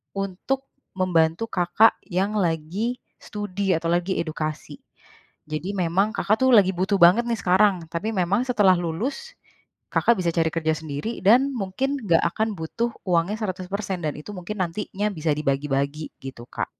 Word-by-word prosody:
untuk 195 Hz, +8 st, -3 dB, 0.3 s
membantu 180 Hz, +2 st, +1 dB
Kakak 190 Hz, +5 st, +3 dB
yang 195 Hz, +3 st, -1 dB
lagi 180 Hz, +7 st, -1 dB, 0.2 s
studi, 200 Hz, -2 st, -2 dB
atau 165 Hz, +1 st, -3 dB
lagi 175 Hz, +2 st, 0 dB
edukasi. 155 Hz, -1 st, -5 dB, 0.7 s
Jadi, 170 Hz, +6 st, -3 dB
memang 185 Hz, +3 st, +1 dB
Kakak 215 Hz, +4 st, +1 dB
tuh, 260 Hz, -, +4 dB
lagi 195 Hz, -3 st, +6 dB
butuh 190 Hz, +3 st, +1 dB
banget 180 Hz, +7 st, +7 dB
nih, 235 Hz, -1 st, 0 dB
sekarang, 185 Hz, -1 st, +3 dB
tapi 185 Hz, +6 st, -2 dB
memang 190 Hz, +4 st, +1 dB
setelah 210 Hz, -7 st, +4 dB
lulus, 235 Hz, -, -4 dB, 0.6 s
Kakak 235 Hz, -1 st, +3 dB
bisa 175 Hz, -2 st, +1 dB
cari 165 Hz, -1 st, +2 dB
kerja 160 Hz, -1 st, +1 dB
sendiri, 155 Hz, +9 st, -5 dB
dan 250 Hz, +8 st, +5 dB
mungkin 240 Hz, +7 st, -2 dB
nggak 170 Hz, -7 st, +3 dB
akan 220 Hz, -1 st, -1 dB
butuh 230 Hz, +9 st, -2 dB, 0.2 s
uangnya 175 Hz, +3 st, +2 dB
100% 190 Hz, -1 st, -4 dB
dan 150 Hz, -2 st, -1 dB
itu 150 Hz, -, -9 dB
mungkin 190 Hz, +3 st, -6 dB
nantinya 200 Hz, +3 st, -2 dB
bisa 160 Hz, -2 st, -1 dB
dibagi-bagi, 140 Hz, +1 st, -1 dB
gitu 130 Hz, -3 st, -9 dB
Kak. -, -, -3 dB
185 Hz, 150 wpm, -24 LUFS, 165-210 Hz, 0.7 s, banget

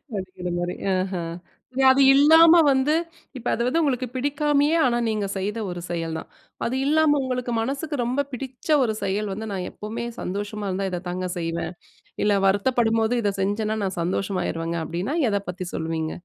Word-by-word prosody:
அப்படிங்கிற 185 Hz, -2 st, -5 dB
மாரி. 175 Hz, 0 st, -2 dB, 0.2 s
ஆஹா. 185 Hz, -2 st, -2 dB, 0.7 s
அது 265 Hz, +1 st, +5 dB
இல்லாம 320 Hz, +4 st, +7 dB, 0.2 s
வந்து 275 Hz, +2 st, +3 dB, 0.4 s
இப்போ 245 Hz, -, -3 dB
அது -, -, -1 dB
வந்து 330 Hz, +6 st, +2 dB
உங்களுக்கு 255 Hz, -4 st, 0 dB
பிடிக்காமயே, 290 Hz, +3 st, +2 dB
ஆனா 240 Hz, -1 st, +2 dB
நீங்க 215 Hz, -2 st, -1 dB
செய்த 205 Hz, +4 st, -2 dB
ஒரு 175 Hz, -1 st, -5 dB
செயல் 165 Hz, -2 st, -3 dB
தான். -, -, -10 dB, 0.4 s
அது 245 Hz, -, -1 dB
இல்லாம 300 Hz, 0 st, +4 dB
உங்களுக்கு 250 Hz, -1 st, -2 dB
மனசுக்கு 280 Hz, +6 st, -2 dB
ரொம்ப 255 Hz, +4 st, 0 dB
பிடிச்ச 255 Hz, +2 st, -7 dB, 0.2 s
ஒரு 220 Hz, -3 st, 0 dB
செயல் 200 Hz, +2 st, -1 dB
வந்து, 220 Hz, +3 st, -5 dB
நான் 185 Hz, -2 st, -3 dB
எப்பவுமே 225 Hz, +3 st, -5 dB, 0.2 s
சந்தோஷமா 205 Hz, +2 st, -4 dB
இருந்தா 190 Hz, +1 st, -1 dB
இத 180 Hz, -, -2 dB
தாங்க 180 Hz, 0 st, -3 dB
செய்வேன். 165 Hz, +1 st, -3 dB, 0.5 s
இல்ல 205 Hz, -1 st, +3 dB
வருத்தப்படும்போது 225 Hz, +2 st, +2 dB
இதை 205 Hz, -2 st, +1 dB
செஞ்சேன்னா, 210 Hz, +2 st, 0 dB
நான் 185 Hz, -2 st, -3 dB
சந்தோஷமாயிருவேங்க 170 Hz, -2 st, -2 dB
அப்டின்னா 180 Hz, -, -3 dB
எத 200 Hz, -1 st, +1 dB
பத்தி 180 Hz, 0 st, -6 dB
சொல்லுவீங்க? 160 Hz, 0 st, -2 dB
210 Hz, 160 wpm, -24 LUFS, 185-260 Hz, 0.7 s, இல்லாம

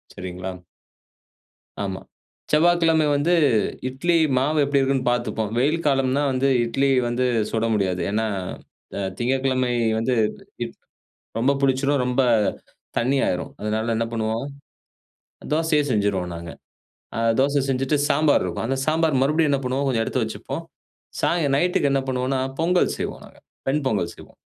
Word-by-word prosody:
சரிங்களா. 90 Hz, +1 st, -6 dB, 1.3 s
ஆமா. 95 Hz, -1 st, -3 dB, 0.5 s
செவ்வாய்கிழம 165 Hz, 0 st, +4 dB
வந்து 150 Hz, +5 st, +2 dB, 0.6 s
இட்லி 170 Hz, +7 st, 0 dB, 0.2 s
மாவு 150 Hz, +4 st, +1 dB
எப்படி 140 Hz, 0 st, +2 dB
இருக்குன்னு 135 Hz, -2 st, +1 dB
பாத்துப்போம். 115 Hz, -3 st, -2 dB
வெயில் 150 Hz, +5 st, +2 dB
காலம்னா 135 Hz, 0 st, +2 dB
வந்து 130 Hz, +1 st, +1 dB, 0.2 s
இட்லி 135 Hz, +4 st, +1 dB, 0.2 s
வந்து 120 Hz, +2 st, 0 dB, 0.3 s
சுட 115 Hz, 0 st, 0 dB
முடியாது. 95 Hz, -3 st, 0 dB
ஏனா, 110 Hz, +2 st, 0 dB, 0.9 s
திங்ககிழமை 130 Hz, 0 st, 0 dB, 0.3 s
வந்து 125 Hz, +2 st, 0 dB, 1.2 s
ரொம்ப 130 Hz, +4 st, +3 dB
புளிச்சுரும். 135 Hz, +1 st, +2 dB
ரொம்ப 125 Hz, +1 st, +1 dB, 0.8 s
தண்ணியாயிரும். 125 Hz, -7 st, 0 dB
அதனால 110 Hz, +2 st, -1 dB
என்ன 115 Hz, +1 st, 0 dB
பண்ணுவோம். 115 Hz, +2 st, -2 dB, 1.1 s
தோசையே 160 Hz, -1 st, +2 dB
செஞ்சுருவோம் 100 Hz, -5 st, 0 dB
நாங்க. 85 Hz, 0 st, -7 dB, 0.7 s
ஆ -, -, -2 dB, 0.2 s
தோச 140 Hz, +1 st, +2 dB
செஞ்சுட்டு 135 Hz, +2 st, +1 dB
சாம்பார் 150 Hz, 0 st, +3 dB
இருக்கு. 90 Hz, +3 st, -3 dB
அந்த 135 Hz, +1 st, -1 dB
சாம்பார் 155 Hz, -3 st, +2 dB
மறுபடியு 155 Hz, +2 st, +2 dB
என்ன 140 Hz, -, +2 dB
பண்ணுவோம், 130 Hz, +2 st, -1 dB
கொஞ்சம் 115 Hz, -3 st, +1 dB
எடுத்து -, -, -1 dB
வச்சுப்போம். -, -, -5 dB, 0.6 s
சாயங் 150 Hz, -5 st, +1 dB
நைட்க்கு 175 Hz, -3 st, +2 dB
என்ன 135 Hz, -1 st, +1 dB
பண்ணுவோனா, 130 Hz, +1 st, 0 dB, 0.2 s
பொங்கல் 180 Hz, +2 st, +2 dB
செய்வோம் -, -, -5 dB
நாங்க. -, -, -18 dB, 0.3 s
வெண் 145 Hz, +2 st, +1 dB
பொங்கல் 100 Hz, -8 st, 0 dB
செய்வோம். -, -, -15 dB
130 Hz, 125 wpm, -23 LUFS, 115-145 Hz, 1.3 s, செவ்வாய்கிழம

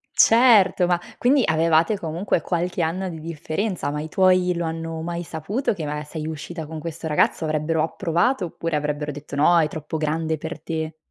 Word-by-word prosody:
Certo, 225 Hz, -6 st, +5 dB
ma 175 Hz, -1 st, +2 dB, 0.2 s
quindi 260 Hz, +2 st, +3 dB
avevate 165 Hz, +5 st, +3 dB
comunque 170 Hz, +2 st, -1 dB
qualche 175 Hz, +2 st, -1 dB
anno 175 Hz, +4 st, -1 dB
di 165 Hz, -3 st, -6 dB
differenza, 165 Hz, +3 st, -3 dB
ma 150 Hz, 0 st, -3 dB
i 155 Hz, -, -6 dB
tuoi 185 Hz, 0 st, +3 dB
lo 170 Hz, 0 st, -2 dB
hanno 165 Hz, 0 st, -4 dB
mai 170 Hz, +1 st, -3 dB
saputo 180 Hz, -, -2 dB
che 165 Hz, -6 st, -5 dB
maga 150 Hz, +1 st, -3 dB
sei 155 Hz, +1 st, -6 dB
uscita 160 Hz, +1 st, -6 dB
con 160 Hz, +1 st, -7 dB
questo 165 Hz, +1 st, -6 dB
ragazzo? 150 Hz, +1 st, +2 dB
Avrebbero 155 Hz, +1 st, 0 dB
approvato 175 Hz, +8 st, 0 dB
oppure 165 Hz, -1 st, -3 dB
avrebbero 150 Hz, 0 st, -2 dB
detto: 145 Hz, 0 st, -8 dB
"No, 170 Hz, +4 st, +5 dB
è 155 Hz, -, +3 dB
troppo 155 Hz, +1 st, -5 dB
grande 160 Hz, +1 st, -1 dB
per 160 Hz, +2 st, -6 dB
te!" 160 Hz, -1 st, -4 dB
165 Hz, 185 wpm, -23 LUFS, 155-175 Hz, 0.2 s, Certo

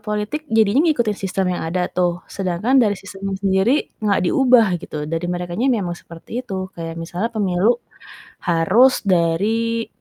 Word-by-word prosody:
politik 210 Hz, +7 st, -3 dB
jadinya 220 Hz, +3 st, +3 dB
ngikutin 235 Hz, -9 st, +1 dB
sistem 190 Hz, -1 st, -1 dB
yang 180 Hz, -, -3 dB
ada 180 Hz, +2 st, 0 dB
tuh, 175 Hz, -1 st, -1 dB
sedangkan 195 Hz, +8 st, +1 dB
dari 205 Hz, -4 st, +2 dB
sistemnya 195 Hz, 0 st, -6 dB
sendiri 195 Hz, +8 st, +1 dB
enggak 205 Hz, -2 st, +1 dB
diubah, 250 Hz, +2 st, +4 dB
gitu, 150 Hz, -1 st, -6 dB
dari 165 Hz, +3 st, -3 dB
merekanya 175 Hz, +6 st, -2 dB
memang 205 Hz, -9 st, 0 dB
seperti 170 Hz, +8 st, -7 dB
itu. 190 Hz, -6 st, -6 dB
Kayak 165 Hz, -1 st, -7 dB
misalnya 175 Hz, +6 st, -3 dB
pemilu 210 Hz, 0 st, +1 dB, 0.7 s
harus 185 Hz, +10 st, +4 dB
dari 210 Hz, +6 st, +1 dB
195 Hz, 145 wpm, -20 LUFS, 175-225 Hz, 0.7 s, diubah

